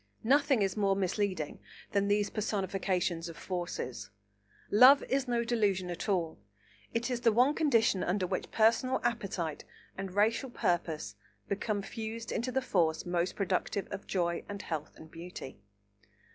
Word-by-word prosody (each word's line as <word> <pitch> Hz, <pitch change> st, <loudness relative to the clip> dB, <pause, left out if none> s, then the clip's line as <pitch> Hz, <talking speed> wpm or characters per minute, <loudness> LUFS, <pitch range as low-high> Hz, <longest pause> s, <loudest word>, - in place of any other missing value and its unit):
Nothing 275 Hz, -1 st, +4 dB
is 195 Hz, -1 st, 0 dB
more 200 Hz, -2 st, +2 dB
misleading 190 Hz, -4 st, -1 dB, 0.3 s
than 200 Hz, 0 st, +1 dB
these 205 Hz, 0 st, +1 dB
personifications 190 Hz, -5 st, -1 dB
of 165 Hz, -, -10 dB
forces. 175 Hz, -9 st, -4 dB, 0.6 s
Love 255 Hz, +7 st, +8 dB
is 270 Hz, 0 st, 0 dB
no 240 Hz, -1 st, +1 dB
delusion 205 Hz, -6 st, 0 dB
at 175 Hz, +5 st, -4 dB
all; 170 Hz, -, 0 dB, 0.5 s
it 235 Hz, +2 st, -1 dB
is 245 Hz, -1 st, -2 dB
the 230 Hz, -1 st, +5 dB
one 250 Hz, +6 st, +4 dB
condition 230 Hz, -, +2 dB
under 185 Hz, +1 st, 0 dB
which -, -, -3 dB
personal 230 Hz, +4 st, +3 dB
appetite 195 Hz, -9 st, -2 dB, 0.3 s
and 195 Hz, -1 st, -6 dB
racial 225 Hz, +6 st, +2 dB
purpose 170 Hz, -8 st, -1 dB, 0.3 s
become 205 Hz, 0 st, -1 dB
fused 225 Hz, +1 st, -6 dB
into 245 Hz, +2 st, -1 dB
the 265 Hz, +1 st, 0 dB
force 165 Hz, -9 st, +1 dB
most 175 Hz, 0 st, -1 dB
productive 195 Hz, 0 st, -1 dB
of 200 Hz, 0 st, -6 dB
joy 170 Hz, -2 st, 0 dB
and 200 Hz, -1 st, -5 dB
health 155 Hz, -2 st, -5 dB
and 160 Hz, 0 st, -13 dB
beauty. 165 Hz, -, -9 dB
200 Hz, 145 wpm, -31 LUFS, 180-230 Hz, 0.6 s, Love